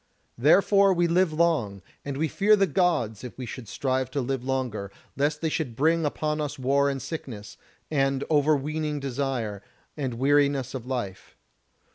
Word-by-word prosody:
Therefore 195 - +5
we 175 0 +2
live 175 0 +2
long, 155 - 0 0.2
and 140 -1 -4
we 160 +2 +1
fear 205 +7 +4
the 195 -1 +3
Gods 140 - 0
if 125 - -8
we 130 - -5
should 120 0 -8
strive 130 +5 -1
to 140 - -2
live 130 0 -2
longer, 125 -7 -2 0.2
lest 145 +2 0
they 160 - 0
should 145 -7 -3
bring 160 +5 +2
upon 150 +1 -1
us 145 0 -4
war 140 +2 +2
and 135 -1 -2
sickness, 130 -7 -7 0.4
and 135 -2 +1
over 150 0 +3
weening 150 +1 -3
desire, 130 -6 -3 0.3
and 135 -5 -3
weariness 140 0 +2
of 125 -2 -6
life. 120 -8 -5
140 Hz, 165 wpm, -26 LUFS, 125-155 Hz, 0.4 s, Therefore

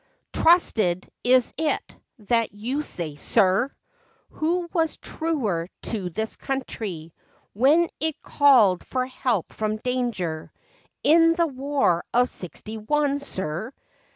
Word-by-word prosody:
" - - -52
Trusted, 215 - +3 0.2
is 250 0 +4
it, 315 -1 -1 0.2
that 230 0 0
you 250 +8 -2
say, 165 - -5
sir! 195 - +2 0.6
Who 345 +3 -1
was 325 -2 0
truer 230 - -2 0.2
to 200 -6 -2
this 220 +6 -3
country 205 - -5 0.4
When 290 +10 +4
it 320 -1 -2
called 245 -11 +4
for 255 -1 -2
help 250 -6 -2
from 215 0 -2
danger 225 -10 -3 0.5
In 330 +2 +5
the 340 -1 +2
war 270 - 0
of 245 +1 +4
sixty 215 +5 -5
one, 285 +5 +1
sir 190 - -5
245 Hz, 120 wpm, -24 LUFS, 195-290 Hz, 0.6 s, In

